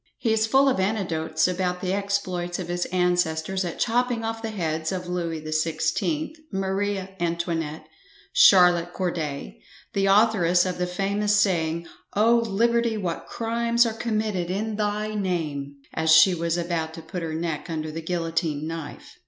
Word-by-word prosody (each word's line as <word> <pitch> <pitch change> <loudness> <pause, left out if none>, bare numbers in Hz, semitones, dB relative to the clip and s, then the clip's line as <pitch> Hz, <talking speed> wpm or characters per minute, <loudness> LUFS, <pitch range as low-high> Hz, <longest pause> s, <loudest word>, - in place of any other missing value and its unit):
He 225 -3 +1
is 220 0 +2
full 270 +4 +4
of 260 -7 +2
anecdotes 170 -6 0
about 180 0 -1
the 185 0 -2
exploits 190 -3 -2
of 180 -2 -6
his 175 0 -1
ancestors 180 0 0
at 175 -2 -4
chopping 245 0 0
off 225 0 -3
the 225 - -3
heads 160 -6 -2
of 185 -1 -3
Louis 170 -2 -2
the 155 0 -7
XVI, 170 - -1 0.2
Maria 195 0 -1
Antonette, 165 -2 -2 0.5
Charlotte 175 -2 +6
Corday, 150 - -4 0.3
the 195 0 +1
authoress 195 -4 +4
of 180 -1 -3
the 180 - 0
famous 200 +3 0
saying 170 -4 +1 0.3
"O! 225 +3 +5
liberty, 230 +1 +1
what 175 -5 -4
crimes 235 +1 +1
are 225 - -1
committed 215 -6 -2
in 210 +4 -2
thy 210 0 -1
name," 160 -8 -2 0.2
as 160 0 -1
she 160 +4 +7
was 170 0 -1
about 165 -2 -2
to 165 - -9
put 175 +2 -6
her 160 -1 -3
neck 165 0 -3
under 155 -1 -3
the 165 +1 -5
guillotine 165 -3 -2
knife. 160 -2 -7
180 Hz, 160 wpm, -25 LUFS, 165-210 Hz, 0.5 s, she